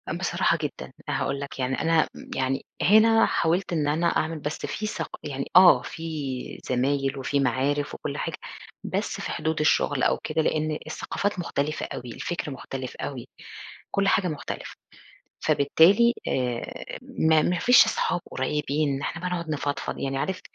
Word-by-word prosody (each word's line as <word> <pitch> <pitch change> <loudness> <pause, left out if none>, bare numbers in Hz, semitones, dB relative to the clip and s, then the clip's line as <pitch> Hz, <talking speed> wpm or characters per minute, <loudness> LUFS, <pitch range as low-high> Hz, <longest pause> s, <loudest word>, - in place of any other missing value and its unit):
أ - - -3
بصراحة - - +1
جدًا، - - -5 0.2
أنا - - -1
هاقول 140 0 -1
لك 140 -1 -7
يعني 130 0 -1
أنا 160 0 +3
امم، - - -11
يعني 130 +1 -1 0.2
هنا 225 +3 +6
حاولت 175 +2 0
إن 150 -3 +1
أنا 160 +4 +2
أعمل 160 -1 0
بس 150 +1 -4
في 215 - -3
ثق - - -4
يعني 140 -2 -4
آه، 180 0 +8
في 150 -6 -5
زمايل 135 +2 +1
وفي 140 +1 0
معارف 140 +3 0
وكل - - -5
حاجة، - - -3 0.5
بس - - -2
في - - -4
حدود 160 0 -1
الشغل 145 -2 +2
أو - - +3
كده، 160 +1 0
لإن 155 0 0
الثقافات 205 -2 -2
مختلفة 155 -3 -2
أوي، 125 -1 -7
الفكر 170 -4 -4
مختلف 130 0 -6
أوي، 130 -4 -6 0.6
كل 200 0 +1
حاجة 190 -2 +3
مختلفة، 155 -4 -5 0.7
فبالتالي 195 +11 +5
آآ، 125 -2 -3
ما 160 -1 +2
ما 175 +2 +1
فيش 245 0 +7
صحاب 175 - 0
قريبين 150 +2 0
إن 135 - -5
إحنا 165 - -4
بقى 180 - -2
نقعد 170 -2 -3
نفضفض، 145 -1 -3
يعني 135 0 -2
عارف 185 +6 -2
150 Hz, 165 wpm, -26 LUFS, 135-170 Hz, 0.7 s, آه